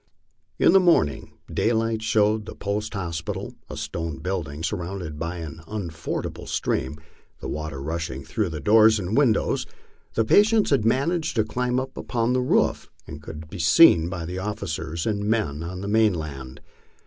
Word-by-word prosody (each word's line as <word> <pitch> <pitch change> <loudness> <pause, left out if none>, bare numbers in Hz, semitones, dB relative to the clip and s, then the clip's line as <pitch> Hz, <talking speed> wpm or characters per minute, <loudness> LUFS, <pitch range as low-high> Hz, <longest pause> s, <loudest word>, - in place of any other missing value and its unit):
In - - +5
the 195 - +8
morning, 165 - +2 0.2
daylight 115 -1 +1
showed 110 -1 +2
the - - -7
post 100 +1 -3
hospital, 85 -4 -4 0.2
a 75 - -7
stone 75 0 -4
building, 80 -5 -4
sur 105 - -1
rounded 85 -4 -6
by 85 +1 -3
an 80 -1 -7
unfordable 85 -7 -5
stream, 65 +4 -1 0.4
the - - -6
water 75 -2 -4
rushing 80 -2 -4
through 105 -5 -1
the 80 -2 -5
doors 110 +7 +5
and 100 +2 -2
windows. 125 -7 +2 0.5
The 115 - +2
patients 210 - +4
had 135 -6 +3
managed 160 +7 +1
to 110 - +3
climb 125 +3 -1
upon 125 -2 -1
the 130 - +2
roof, 125 - +1 0.2
and 75 -2 -9
could 75 0 -9
be 90 - -9
seen 85 - +6
by 90 -3 -4
the 90 +2 -4
officers 85 -5 -4
and 105 -2 -1
men 105 -9 0
on 90 +2 -5
the 100 - -4
mainland. 80 -12 0
95 Hz, 160 wpm, -24 LUFS, 80-110 Hz, 0.5 s, the